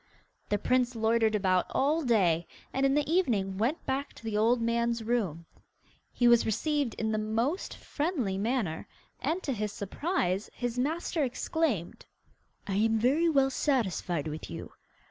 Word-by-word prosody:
The 205 - +2
prince 250 +3 +1
loitered 225 -1 +2
about 185 -3 +2
all 300 +5 +1
day, 180 - +2 0.3
and 270 +1 +2
in 270 - +2
the 295 -1 +1
evening 220 - +1
went 255 +10 0
back 275 +2 -2
to - - -15
the 220 -2 -3
old 230 +3 +3
man's 235 0 0
room. 200 -9 -1 0.7
He 245 - +2
was 235 -1 +6
received 275 +3 0
in 220 0 -1
the 215 - 0
most; 230 - -1
friendly 290 - -2
manner, 215 -7 -1 0.3
and, 325 +7 -1
to 275 - -1
his 210 -2 -2
surprise, 200 - -2
his 245 0 -3
master 315 +3 0
exclaimed, 255 - -2 0.6
'I 195 - -2
am 225 +1 +3
very 280 +9 +3
well 275 -3 +3
satisfied 190 - 0
with 155 +1 -6
you. - - -7
235 Hz, 155 wpm, -29 LUFS, 210-275 Hz, 0.7 s, was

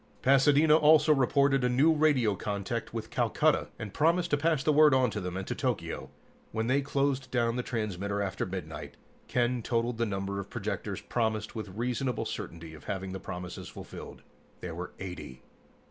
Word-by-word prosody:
Pasadena 145 +3 +5
also 155 0 +6
reported 135 0 +3
a 125 - +3
new 140 +6 +4
radio 145 -8 +3
contact 100 0 -3
with - - -5
Calcutta, - - +2
and 105 -2 -7
promised 170 +3 +2
to - - +5
pass 155 -2 +1
the 155 - +3
word 150 -2 +6
on 130 -3 +3
to 105 - -3
them 90 0 -4
and 95 - -4
to - - -2
Tokyo. - - -3 0.4
When 110 0 -1
they 130 +4 +2
closed 135 -1 0
down 120 -2 +1
the 125 - 0
transmitter 100 -4 -3
after 100 -1 -2
midnight, 80 -5 -6 0.3
Ken 120 0 +1
totaled 115 0 -1
the 115 - +1
number 100 0 -3
of 100 - -6
projectors - - -4
promised 110 -3 -1
with 105 -3 -7
reasonable 125 +1 -1
certainty 80 -1 -6
of 75 - -13
having 95 -1 -4
the 95 - -5
promises 90 -1 -7
fulfilled. - - -10 0.4
There 85 - -5
were 90 +2 -6
eighty. 85 -9 -8
115 Hz, 175 wpm, -29 LUFS, 95-140 Hz, 0.4 s, also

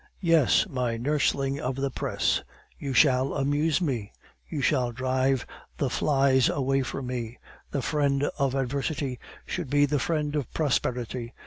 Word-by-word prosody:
"Yes, 165 -6 +4
my 125 -3 -2
nursling 140 +1 0
of 130 -3 -2
the 135 0 -2
press. - - 0 0.4
You 140 - -4
shall 130 0 +3
amuse 145 +3 +1
me; 120 - -2 0.4
you 155 - -3
shall 130 -3 +1
drive 130 +1 0 0.3
the 135 -4 -1
flies 135 -2 +3
away 135 -1 +1
from 130 +1 -4
me. 125 -2 -4 0.3
The 140 - -2
friend 140 -2 +1 0.2
of 135 -1 +1
adversity 135 0 -2 0.3
should 175 -7 -4
be 145 +1 +4
the 145 0 0
friend 150 -2 -1
of 145 -6 -2
prosperity. 125 -5 -1
135 Hz, 145 wpm, -27 LUFS, 125-145 Hz, 0.4 s, Yes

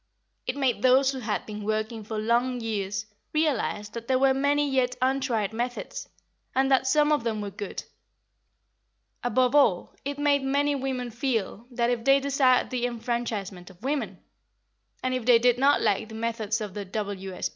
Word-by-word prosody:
It 255 - -1
made 255 -6 +1
those 260 +2 +5
who 265 - -5
had 215 -3 -2
been 210 -1 -7
working 215 +1 -2
for 220 +1 -5
long 240 +3 +1
years 205 -2 -3 0.3
realise 265 -9 0
that 235 +1 -8
there 260 - +3
were 265 0 +4
many 285 +2 +2
yet 255 -2 +1
untried 255 -5 0
methods, 245 +2 -4 0.5
and 265 +1 +2
that 265 0 +3
some 300 +2 +3
of 295 -5 +2
them 225 -2 -1
were 205 -1 -4
good. 200 +1 -6 1.4
Above 250 +1 +2
all, 225 -12 +3
it 285 +1 -4
made 290 -1 +2
many 285 +2 +1
women 260 -3 -3
feel 235 -3 -2
that, 240 -1 0
if 235 -2 -2
they 275 +2 +5
desired 270 -2 +2
the 245 -1 0
enfranchisement 225 -6 -4
of 185 +3 -18
women, 280 +2 -2 0.9
and 255 0 0
if 255 -2 -1
they 245 -2 +8
did 245 +1 +3
not 280 +2 +4
like 210 +2 +1
the 220 - -9
methods 225 -1 -2
of 205 -3 -5
the 205 0 -4
W.S. 195 -2 -4
245 Hz, 175 wpm, -26 LUFS, 215-270 Hz, 1.4 s, they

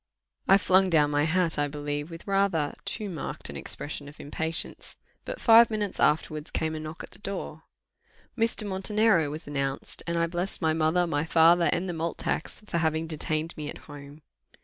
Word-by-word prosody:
I 195 - +7
flung 190 -1 +3
down 150 -4 +3
my 145 0 +2
hat, 165 -1 +1
I 145 - +2
believe, 145 +1 -4
with 165 0 -10
rather 195 -7 +1
too 215 - -3
marked 170 -6 -5
an - - -10
expression 145 -1 -6
of 150 - -16
impatience; 160 +3 -1 0.3
but - - -5
five 230 0 +7
minutes 210 -3 -3
afterwards 155 0 +1
came 160 0 -2
a 155 - -4
knock 155 +1 -7
at - - -11
the - - -13
door. 190 -6 -6 0.7
Mr. 230 -2 +1
Montenero 195 -3 +2
was 155 +2 -7
announced, 140 -1 -3
and 170 0 -1
I 170 - +2
blessed 175 +3 -3
my 160 -2 +1
mother, 160 +3 +2
my 145 -3 -1
father, 165 +1 +5
and 180 +3 -1
the 175 - -3
malt 165 0 -3
tax, 165 - -3
for 170 - -1
having 160 0 0
detained 155 +1 -2
me 150 -2 -5
at - - -7
home. 145 0 -12
160 Hz, 190 wpm, -27 LUFS, 150-185 Hz, 0.7 s, I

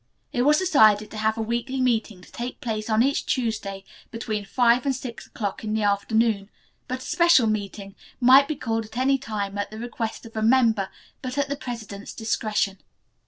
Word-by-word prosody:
It 245 - +1
was 295 +4 +5
decided 215 - +4
to 220 - -7
have 220 +1 0
a 225 - -1
weekly 240 +4 -2
meeting 225 -6 0
to - - -17
take 245 +1 -6
place 215 -1 -3
on 220 +1 +4
each 280 +2 +1
Tuesday 215 -6 -2 0.3
between 215 -3 -4
five 240 +3 +3
and 275 -2 0
six 245 -2 -7
o'clock 205 -2 -4
in 215 0 -2
the 220 - 0
afternoon, 205 0 +1 0.4
but 255 0 -4
a - - -10
special 340 -8 +4
meeting 200 -2 -3 0.3
might 265 +2 +7
be 310 - -2
called 225 -3 -2
at 220 +2 -11
any 270 +1 +2
time 205 -5 -4
at 205 - -2
the 215 - -9
request 230 0 -5
of 225 - -12
a 220 - -1
member, 225 -4 +3 0.3
but 255 +1 -5
at 280 -1 0
the 285 - -1
president's 225 -7 -7
discretion. 215 -3 -1
225 Hz, 195 wpm, -24 LUFS, 215-255 Hz, 0.4 s, might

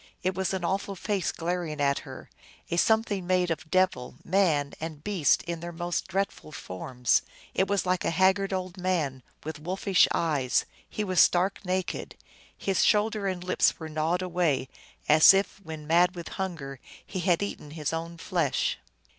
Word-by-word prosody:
It 185 +1 +1
was 190 0 -1
an 190 -2 -2
awful 195 +2 -1
face 195 -2 -1
glaring 170 -2 -3
at 140 -1 +2
her, - - -11 0.4
a 170 - 0
something 210 -2 +2
made 180 -2 +2
of 160 0 -4
devil, 185 -7 +1
man, 165 -7 +2
and 155 -2 -6
beast 190 -9 +2
in 170 -1 -4
their 170 +1 -6
most 175 +1 -3
dreadful 195 -4 -3
forms. 125 +2 -1 0.3
It 190 - +1
was 200 -1 0
like 185 0 0
a - - +1
haggard 190 +3 +2
old 185 -1 -3
man, 160 -8 -1 0.2
with 155 -1 -6
wolfish 185 +3 +2
eyes; 145 -6 +1 0.2
he 215 - -3
was 185 -3 0
stark 185 +3 +3
naked; 185 0 -3 0.4
his 195 -2 +1
shoulders 210 -2 +2
and 180 -1 -6
lips 185 - +2
were 160 -1 -6
gnawed 160 +4 0
away, 170 -7 0 0.4
as 155 +5 +8
if, 195 0 -1
when 160 -4 -8
mad 175 +3 +3
with 170 -1 -7
hunger, 165 -9 -5 0.3
he 190 - -5
had 180 +1 +2
eaten 175 -7 -6
his 150 0 -3
own 165 +1 -4
flesh. - - 0
175 Hz, 170 wpm, -27 LUFS, 155-190 Hz, 0.4 s, as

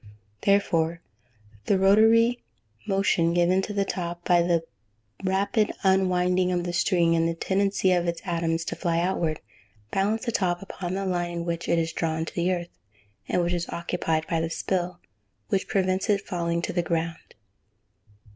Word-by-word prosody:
Therefore 170 -5 +2 0.7
the 200 - +3
rotatory 225 +5 +4 0.5
motion 195 -4 +2
given 175 +2 +3
to 210 - -5
the 200 -1 0
top, 175 -2 -4
by 175 -1 +4
the 170 -1 +1 0.6
rapid 200 +3 +1
unwinding 185 -1 +2
of 175 -1 0
the 175 0 -3
string, 175 -1 +2
and 165 0 +2
the 165 - -2
tendency 195 +1 +1
of 175 -1 +2
its 170 0 -1
atoms 165 -2 -1
to - - -3
fly 170 -3 -1
outward, 170 -3 -1 0.5
balance 210 +4 0
the 235 - 0
top 180 -5 0
upon 185 -2 -5
the 195 0 -2
line 175 -2 -1
in 170 0 -4
which 170 -1 -3
it 170 - +3
is 165 0 -1
drawn 160 -1 -1
to - - -8
the 175 +1 0
earth, 175 -1 -2 0.6
and 180 - +1
which 175 +1 0
is 170 -1 -2
occupied 165 -2 -2
by 165 -1 -1
the 165 - -2
spill, 180 0 -2 0.5
which 190 - 0
prevents 190 0 0
it 200 -1 +1
falling 170 -2 -2
to - - -2
the 175 - +1
ground. 165 -1 -3
175 Hz, 170 wpm, -26 LUFS, 170-195 Hz, 0.7 s, rotatory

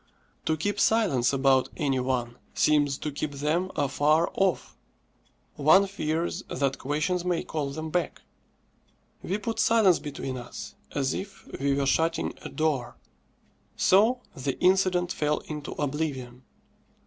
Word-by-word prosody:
To 160 - +2
keep 205 +6 -2
silence 140 - +3
about 135 -1 +3
any 135 -4 +1
one 125 -2 -2 0.2
seems 145 -2 +3
to 150 - -4
keep 145 +1 -4
them 155 +6 0
afar 150 +3 +2
off. 190 -2 0 0.8
One 160 +7 +6
fears 170 -4 -2
that 135 0 -1
questions 155 +6 -1
may 180 -2 0
call 150 -3 -3
them 155 +3 -5
back. 175 0 -2 1.0
We 190 - -2
put 225 +2 -4
silence 215 -6 +4
between 135 -3 -5
us, 120 0 -8 0.2
as 135 -2 0
if 195 0 -7
we 140 0 +1
were 140 0 0
shutting 165 +4 +1
a - - -7
door. 150 -6 -1 0.8
So 225 +7 +4
the 135 0 -3
incident 185 -1 +3
fell 150 -2 0
into 150 -2 -6
oblivion. 135 -4 -3
150 Hz, 135 wpm, -27 LUFS, 135-180 Hz, 1.0 s, One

